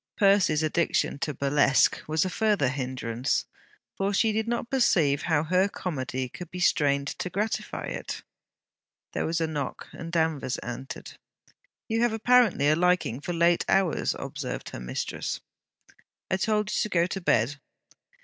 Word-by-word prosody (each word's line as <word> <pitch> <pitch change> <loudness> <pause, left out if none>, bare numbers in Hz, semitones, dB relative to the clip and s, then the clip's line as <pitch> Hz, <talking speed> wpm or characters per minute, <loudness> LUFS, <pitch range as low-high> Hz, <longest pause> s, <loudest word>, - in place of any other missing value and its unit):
Percy's 195 -7 +4
addiction 155 -2 +1
to 150 - -1
burlesque 140 0 +3
was 155 +3 +1
a - - -1
further 205 - +2
hindrance, 130 -3 -2 0.5
for 195 +1 0
she 220 +2 +3
did 220 +1 -1
not 235 0 -2
perceive 165 - +3
how 155 -3 +1
her 185 +4 +2
comedy 130 -9 -3
could 175 +7 -9
be 180 - -7
strained 140 -5 +2
to 180 - -2
gratify 205 +4 -2
it. - - -5 0.9
There - - -1
was 165 +1 0
a 165 - +1
knock, 150 -4 -4
and 165 0 -8
Danvers 160 -6 0
entered. 120 +3 -7 0.7
'You 225 0 0
have 240 -2 +2
apparently 225 - +4
a 155 - +5
liking 180 -7 +1
for 175 - -3
late 170 0 +3
hours,' 190 -4 +2
observed - - -5
her - - -6
mistress. - - -3 0.9
'I 190 - +3
told 210 +1 0
you - - +1
to 215 - -1
go 170 -3 +3
to 190 +2 -4
bed.' 140 -2 +1
165 Hz, 155 wpm, -27 LUFS, 140-195 Hz, 0.9 s, a